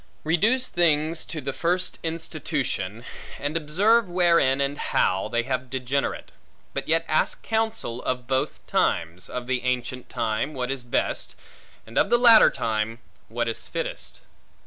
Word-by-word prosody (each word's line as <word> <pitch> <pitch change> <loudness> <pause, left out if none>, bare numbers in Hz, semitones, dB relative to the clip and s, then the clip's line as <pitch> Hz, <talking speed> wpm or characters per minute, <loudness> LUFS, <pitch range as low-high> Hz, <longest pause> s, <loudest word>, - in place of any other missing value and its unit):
Reduce 215 +11 +2
things 160 -1 +2
to 155 - -5
the 135 0 -3
first 180 +2 -1
institution, 120 - -3 0.3
and 145 +2 -3
observe 190 +8 +3
wherein, 170 -7 +3
and 140 +1 -1
how, 95 +1 +1
they 120 0 0
have 130 0 -3
degenerate; 135 +1 -2 0.4
but - - -3
yet 165 +1 +2
ask 155 - +1
counsel 220 - -1
of 125 -1 -2
both 130 +1 -2
times; 85 +2 0
of 125 -1 -4
the 130 0 -1
ancient 125 0 -2
time, 115 +7 -2
what 125 0 -2
is 135 -2 -4
best; 120 - -2 0.5
and 110 - -1
of - - +3
the 240 - +5
latter 235 -2 +8
time, 110 0 -2 0.3
what 120 +1 -2
is 115 - -4
fittest. - - -4
135 Hz, 145 wpm, -25 LUFS, 120-170 Hz, 0.5 s, latter